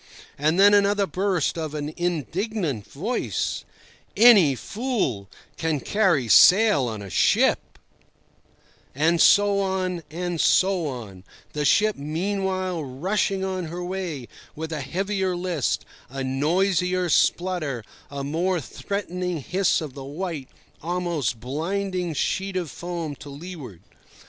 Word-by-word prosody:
And 155 +5 +1
then 205 +1 +7
another 200 0 +3
burst 185 -4 -1
of 155 -2 -4
an 150 +1 -4
indignant 175 - -2
voice: 210 - -2 0.5
"Any 205 - +7
fool 195 - -2 0.3
can 160 -3 -1
carry 170 - +1
sail 180 - +6
on 110 -3 -5
a 100 - -8
ship—" - - +2 1.2
And 160 +4 +2
so 205 -1 +5
on 185 -2 -1
and 175 +1 -2
so 185 -4 +3
on, 110 -9 -7 0.3
the 150 0 -1
ship 215 +7 +3
meanwhile 185 +3 -2
rushing 190 +8 -1
on 185 -2 -3
her 175 +2 -5
way 175 -9 -4 0.3
with 160 +1 -5
a 150 - -3
heavier 190 +6 -1
list, 175 -6 -1 0.2
a 135 +1 -5
noisier 180 +6 +1
splutter, 165 -6 +1 0.3
a 140 -1 -5
more 170 +6 0
threatening 180 - -4
hiss 180 +6 +1
of 150 -4 -6
the 135 - -8
white, 150 -1 -5 0.3
almost 170 -8 -2
blinding, 175 - -3
sheet 190 +6 -1
of 170 -6 -3
foam 170 -2 -5
to 145 - -11
leeward. 140 - -9
175 Hz, 125 wpm, -24 LUFS, 145-190 Hz, 1.2 s, then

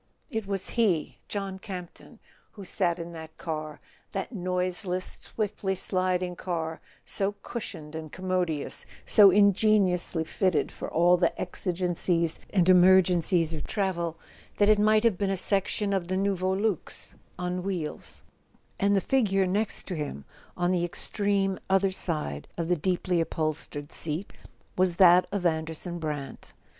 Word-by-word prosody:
It 220 -4 -3
was 195 -1 -2
he, 200 -10 0
John 195 -2 -4
Campton, 180 -4 -9 0.4
who 200 -3 -10
sat 175 -2 0
in 170 0 -6
that 160 -1 -10
car—that 155 -2 -6
noiseless 180 -1 -1
swiftly 205 -3 -2
sliding 185 -1 -1
car, 165 -3 -4 0.2
so 200 +1 -1
cushioned 160 -10 -6
and 160 -1 -6
com¬ 185 - -10
modious, 180 -5 0 0.2
so 205 -2 +7
ingeniously 195 -3 +3
fitted 180 +1 0
for - - -6
all 175 +2 +4
the 170 -1 0
exigencies 175 -2 -1
and 185 -3 +2
emergencies 180 -2 +5
of 155 - -4
travel, 175 -5 -2 0.4
that 205 0 +4
it 215 -1 +5
might 215 +1 +4
have 225 -6 +2
been 200 -1 +1
a 195 - 0
section 200 +2 +2
of 185 -3 -1
the 185 +1 -1
Nouveau 190 -1 0
Luxe 195 -1 -2 0.2
on 180 0 -2
wheels; 180 -5 -4 0.6
and 200 +1 +3
the 195 - +3
figure 195 -7 +2
next 205 +4 -1
to 185 - -5
him, 145 - -5 0.3
on 175 0 +1
the 180 -2 +1
extreme 195 +2 -1
other 195 0 +3
side 150 - -3
of 170 0 -2
the 180 - +4
deeply 180 +1 0
upholstered 155 -2 -3
seat, 165 +5 -3 0.4
was 180 -1 +2
that 180 -1 +6
of 200 -3 -2
Anderson 160 +1 -2
Brant. 150 -3 -5
180 Hz, 145 wpm, -27 LUFS, 170-195 Hz, 0.6 s, so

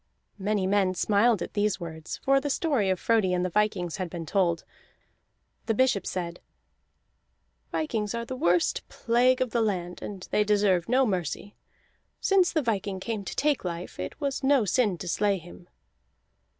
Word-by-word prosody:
Many 200 0 0
men 190 -1 +2
smiled 210 +2 +3
at - - -8
these 205 -1 +1
words, 160 -2 -6
for 275 0 +4
the 290 - -2
story 275 - +1
of 185 -1 +1
Frodi 215 -5 +2
and 180 0 +1
the 185 - -2
vikings 195 -4 0
had 185 -2 -3
been 165 -1 -6
told. 170 -1 +1 1.0
The 225 - +1
bishop 255 -6 +2
said: 175 -2 -4 1.3
"Vikings 225 -9 -2
are 235 0 -3
the 255 - -5
worst 175 -7 +2
plague 250 +2 +2
of 255 -3 0
the 235 - +1
land, 180 -5 -2
and 195 -3 -7
they 210 - +3
deserve 200 -4 +2
no 260 +2 +4
mercy. 195 0 -3 0.7
Since 385 -3 +3
the 310 -3 0
viking 200 -4 -1
came 215 +1 -3
to - - -6
take 290 -1 +1
life, 175 -1 -5
it 90 - -5
was 280 -1 -2
no 270 -4 +4
sin 205 -1 +2
to 180 - -7
slay 200 +3 +1
him." 175 +1 -13
205 Hz, 170 wpm, -27 LUFS, 180-235 Hz, 1.3 s, for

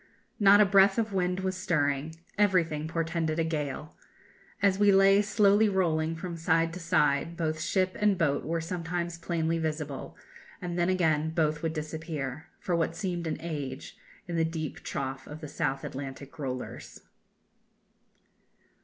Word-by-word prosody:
Not 205 0 +7
a 210 - +7
breath 195 +1 +5
of 220 -2 0
wind 180 0 0
was 190 0 -1
stirring. 145 -3 0 0.2
Everything 170 -7 +2
portended 165 -1 -1
a 165 - +2
gale. 150 -1 -3 0.6
As 200 -1 +2
we 205 -1 +6
lay 195 +1 +6
slowly 205 +1 +4
rolling 165 -4 +1
from 170 +1 -5
side 165 0 +2
to 180 - -6
side, 165 -1 +1
both 155 -2 -1
ship 185 +2 0
and 205 -2 +3
boat 145 -5 +1
were 165 +1 -1
sometimes 170 0 -3
plainly 165 -1 -1
visible, 150 -3 -4 0.4
and 175 -1 -4
then 175 0 +1
again 160 -4 +2
both 155 -2 0
would 160 -1 -1
disappear, 155 -2 -5
for 175 - -1
what 165 -1 0
seemed 175 -4 -3
an 160 - -2
age, 145 -5 -5 0.3
in 170 -1 -3
the 165 - +3
deep 160 -2 -3
trough 135 -1 -4
of 150 +1 -8
the 150 - -7
South 135 -1 -2
Atlantic 135 +1 -7
rollers." 130 -3 -6
165 Hz, 155 wpm, -29 LUFS, 155-185 Hz, 0.6 s, Not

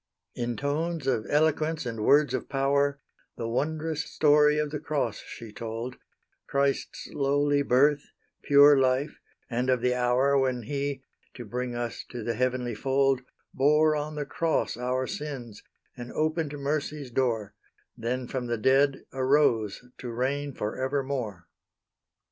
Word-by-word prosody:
In 120 -1 -3
tones 155 +3 -2
of 125 -5 0
eloquence 155 0 +1
and 115 -3 -3
words 145 +5 +4
of 130 - -3
power, 140 +1 +1 0.4
The 115 - -3
wond'rous 155 +5 -1
story 150 0 +4
of 150 -1 -1
the 150 - -3
cross 150 -1 -2
she 115 -3 -10
told; 115 +3 -5 0.5
Christ's 140 0 -1
lowly 145 0 +2
birth, 140 +2 +3 0.4
pure 145 0 +7
life, 130 +3 +1 0.3
and 125 +1 -1
of 125 -2 +2
the 125 0 +2
hour 125 +3 +2
When 130 -2 0
He, 140 +1 -3 0.3
to 120 - -8
bring 125 +2 -4
us 120 -1 -4
to 120 -3 -6
the 115 - -1
heavenly 125 0 -1
fold, 135 +3 +1 0.3
Bore 150 +3 +4
on 150 +1 -3
the 145 -1 -3
cross 160 +3 0
our 125 +2 -1
sins, 130 -7 -6 0.3
and 120 -1 -8
opened 155 -1 -1
mercy's 145 -1 -3
door, 115 -5 0 0.4
Then 125 +2 -3
from 125 -1 -3
the 120 0 -1
dead 135 +4 +3
arose 130 -5 +2
to 125 - -6
reign 135 +3 -2
for 105 +4 -3
evermore. 130 - -2
135 Hz, 145 wpm, -27 LUFS, 125-145 Hz, 0.5 s, pure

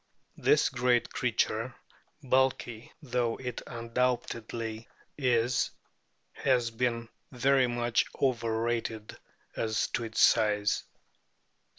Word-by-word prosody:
This - - +4
great 125 -1 +1
creature, 120 -1 0 0.5
bulky 130 -3 0
though 125 -3 0
it 125 -2 -5
undoubtedly 115 -1 -2 0.3
is, 125 -2 +2 0.6
has 125 -4 +1
been 115 0 -1 0.2
very 130 0 +3
much 120 -1 +1
over 115 -4 0
rated 115 -2 -2 0.4
as 110 -1 0
to 120 - -2
its 110 -1 -4
size. 105 -2 +3
120 Hz, 90 wpm, -30 LUFS, 115-125 Hz, 0.6 s, This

